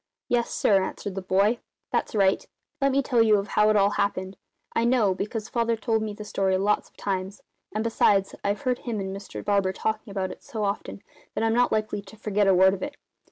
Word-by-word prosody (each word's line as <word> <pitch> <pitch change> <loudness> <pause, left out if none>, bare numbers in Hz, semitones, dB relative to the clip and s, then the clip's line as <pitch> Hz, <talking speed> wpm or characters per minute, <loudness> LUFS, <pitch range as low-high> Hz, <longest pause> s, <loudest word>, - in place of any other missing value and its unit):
"Yes, 240 -1 +1
sir," 195 -2 +3
answered 200 +1 -5
the 195 - -4
boy, 200 +5 +2 0.3
"that's - - -1
right. 195 -2 +3 0.4
Let 275 0 +3
me 275 +1 +2
tell 245 -3 +2
you 215 -2 +5
how 210 +1 +2
it 215 - +3
all 200 0 +4
happened. 195 -2 -1 0.4
I 230 - +2
know, 235 -5 +3
because 210 +3 -4
Father 235 -1 0
told 225 0 0
me 215 -1 -3
the 210 - -8
story 190 -2 +1
lots 205 +2 +1
of - - -36
times; 195 0 -3 0.3
and 215 +1 -2
besides, 205 -4 +2
I've 200 +1 -1
heard 250 -2 0
him 230 -4 -3
and 190 0 -4
Mr 200 0 -8
Barber 200 -2 +2
talking 220 +2 -2
about 190 -2 -2
it - - -11
so 220 -2 -4
often 200 0 -3 0.3
that - - 0
I'm 225 0 +2
not 245 +1 +3
likely 215 -1 -1
to 200 +2 -15
forget 210 -1 +1
a 190 - +5
word 190 +1 +6
of 195 - -5
it. 290 0 -4
210 Hz, 220 wpm, -26 LUFS, 195-225 Hz, 0.4 s, word